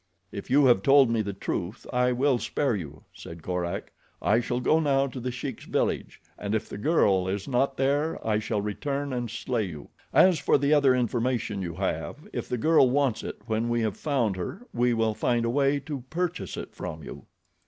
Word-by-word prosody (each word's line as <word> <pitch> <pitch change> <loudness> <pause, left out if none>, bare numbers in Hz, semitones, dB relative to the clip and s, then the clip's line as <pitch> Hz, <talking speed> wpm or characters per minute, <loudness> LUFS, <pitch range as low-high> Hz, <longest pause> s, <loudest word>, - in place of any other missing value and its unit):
"If 100 - -7
you 140 +1 +5
have 120 -7 +5
told 135 0 +5
me 115 -1 +1
the 100 -1 -3
truth 95 +1 -4
I 125 0 +3
will 130 0 +2
spare 135 -2 0
you," 75 -6 -7
said 80 -1 -10
Korak. 90 -1 -3 0.3
"I 110 +3 +3
shall 120 +1 -2
go 155 +5 +3
now 140 -3 +2
to 130 -1 -6
The 125 +1 -3
Sheik's 130 0 -6
village - - -1 0.2
and 105 +1 -2
if 110 - -2
the - - -7
girl 100 - +3
is 95 +1 -3
not 135 +1 +1
there 145 +4 +1
I 105 -1 +2
shall 105 -1 -2
return 140 +6 -3
and 120 -2 -2
slay 115 0 -2
you. 75 -6 -9 0.2
As 185 -4 +5
for 140 - +3
the 140 +2 +2
other 140 -3 +5
information 120 -4 -1
you 85 -3 -4
have, 80 -5 -3
if - - -4
the 125 - -1
girl 155 0 +4
wants 130 -4 +1
it - - -7
when 110 +1 -1
we 120 0 +1
have 110 -3 -1
found 125 -10 0
her 180 - -6
we 120 +1 +2
will 110 -1 +1
find 120 +2 0
a 115 - 0
way 140 +2 +2
to 140 -2 -5
purchase 180 +1 -3
it - - -7
from 80 0 -6
you." - - -10
120 Hz, 205 wpm, -27 LUFS, 105-140 Hz, 0.3 s, you